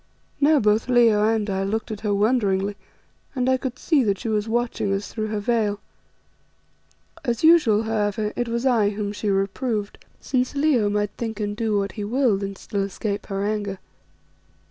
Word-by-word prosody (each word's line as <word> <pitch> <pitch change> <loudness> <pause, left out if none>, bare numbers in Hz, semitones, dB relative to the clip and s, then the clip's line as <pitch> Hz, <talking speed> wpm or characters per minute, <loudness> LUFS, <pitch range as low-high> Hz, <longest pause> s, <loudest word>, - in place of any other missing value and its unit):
Now 295 +2 +5
both 215 +1 +2
Leo 230 -4 +4
and 220 -1 +1
I 195 -1 -1
looked 220 +3 -2
at 215 - -5
her 210 -1 -2
wonderingly, 205 -2 +1 0.6
and 255 -1 0
I 260 0 +3
could 255 -1 -5
see 295 -3 +2
that 200 -2 +1
she 225 - -5
was 215 0 -1
watching 235 -3 -1
us 195 +1 -3
through 215 -1 -2
her 215 -1 -2
veil. 210 -2 0 1.4
As 240 -1 -2
usual, 300 -10 +5
however, 210 -1 -1
it 240 - -1
was 235 +2 -2
I 230 -6 +3
whom 205 0 -3
she 210 0 -3
reproved, 200 +2 -2 0.2
since 255 +1 -1
Leo 280 -8 +2
might 205 0 0
think 225 -2 -4
and 205 -1 -2
do 215 -1 0
what 200 0 -1
he 210 - -6
willed 225 -2 +1
and 195 -1 -5
still 200 -3 -3
escape 200 +1 -3
her 195 -1 -2
anger. 205 -2 -2
215 Hz, 180 wpm, -23 LUFS, 205-240 Hz, 1.4 s, Now